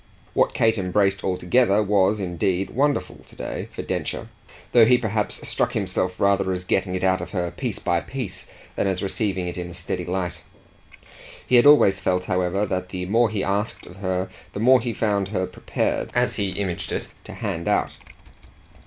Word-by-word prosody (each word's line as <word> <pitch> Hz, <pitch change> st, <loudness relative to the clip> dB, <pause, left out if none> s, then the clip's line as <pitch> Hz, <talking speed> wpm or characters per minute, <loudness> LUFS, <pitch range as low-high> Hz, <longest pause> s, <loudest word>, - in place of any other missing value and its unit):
What -, -, +2 dB
Kate 110 Hz, -1 st, +3 dB
embraced 95 Hz, +1 st, +1 dB
altogether 100 Hz, +3 st, +2 dB
was 100 Hz, 0 st, +2 dB
indeed 90 Hz, +1 st, -1 dB
wonderful 145 Hz, +3 st, 0 dB
to -, -, -19 dB
day -, -, -5 dB
for -, -, -6 dB
Densher, -, -, -3 dB, 0.4 s
though 120 Hz, -2 st, +7 dB
he 125 Hz, 0 st, +6 dB
perhaps 110 Hz, -3 st, -2 dB
struck -, -, 0 dB
himself 90 Hz, 0 st, -1 dB
rather 100 Hz, -1 st, +2 dB
as 90 Hz, -1 st, -3 dB
getting 95 Hz, 0 st, 0 dB
it 95 Hz, -, -3 dB
out 95 Hz, -1 st, +2 dB
of 90 Hz, -, -6 dB
her 90 Hz, -3 st, -1 dB
piece -, -, -4 dB
by 85 Hz, -1 st, 0 dB
piece 120 Hz, -4 st, -6 dB, 0.3 s
than -, -, 0 dB
as 95 Hz, -1 st, -1 dB
receiving 95 Hz, -2 st, -1 dB
it 90 Hz, +1 st, -4 dB
in 90 Hz, 0 st, -5 dB
a 85 Hz, -, -10 dB
steady 90 Hz, 0 st, -4 dB
light. 90 Hz, -2 st, -3 dB, 1.0 s
He 125 Hz, -, +3 dB
had 120 Hz, -, +6 dB
always 145 Hz, -10 st, +6 dB
felt, 90 Hz, 0 st, 0 dB
however, 90 Hz, +2 st, 0 dB
that 95 Hz, -2 st, -3 dB
the 90 Hz, -1 st, -4 dB
more 115 Hz, +4 st, +3 dB
he 105 Hz, -2 st, -2 dB
asked 100 Hz, +3 st, -2 dB
of 90 Hz, -, -13 dB
her 95 Hz, -1 st, -1 dB, 0.3 s
the -, -, -4 dB
more 125 Hz, +3 st, +5 dB
he 120 Hz, 0 st, -2 dB
found 105 Hz, -4 st, 0 dB
her 95 Hz, -2 st, -1 dB
prepared, -, -, -2 dB
as -, -, +1 dB
he 100 Hz, -1 st, 0 dB
imaged 95 Hz, -4 st, -3 dB
it, -, -, -3 dB, 0.2 s
to -, -, -9 dB
hand 85 Hz, +1 st, -4 dB
out. -, -, +2 dB
95 Hz, 190 wpm, -23 LUFS, 90-105 Hz, 1.0 s, though